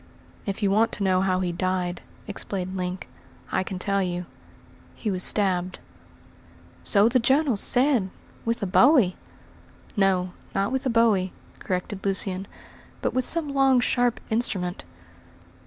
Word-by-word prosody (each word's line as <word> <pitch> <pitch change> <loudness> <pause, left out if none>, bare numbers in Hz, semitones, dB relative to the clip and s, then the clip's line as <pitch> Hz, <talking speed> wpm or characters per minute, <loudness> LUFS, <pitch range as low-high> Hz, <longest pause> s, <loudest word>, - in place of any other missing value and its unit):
"If 200 +2 -3
you 195 - +2
want 225 +3 +3
to 205 - -3
know 185 -1 +2
how 185 -1 +1
he 180 -1 -1
died," 180 0 -2 0.3
explained 190 -2 -5
Link, 180 0 -4 0.4
"I - - +1
can 185 0 -5
tell 200 +2 0
you. 180 -1 -3 0.7
He 215 - -3
was 185 -1 -1
stabbed." 185 -3 +2 1.1
"So 205 +1 +4
the 250 +2 +3
journals 265 -2 +2
said; 250 -6 +3 0.3
with 230 -1 -2
a - - +1
bowie!" 200 - +4 0.8
"No, 190 -3 +1 0.2
not 195 +4 0
with 265 +1 -1
a - - +1
bowie," 220 -6 +2 0.3
corrected 190 +1 -4
Lucian, 195 -1 0 0.6
"but - - 0
with 255 -1 +1
some 315 -4 +2
long, 270 -2 +4
sharp 245 -1 +1
instrument." 190 -5 0
195 Hz, 140 wpm, -25 LUFS, 185-235 Hz, 1.1 s, So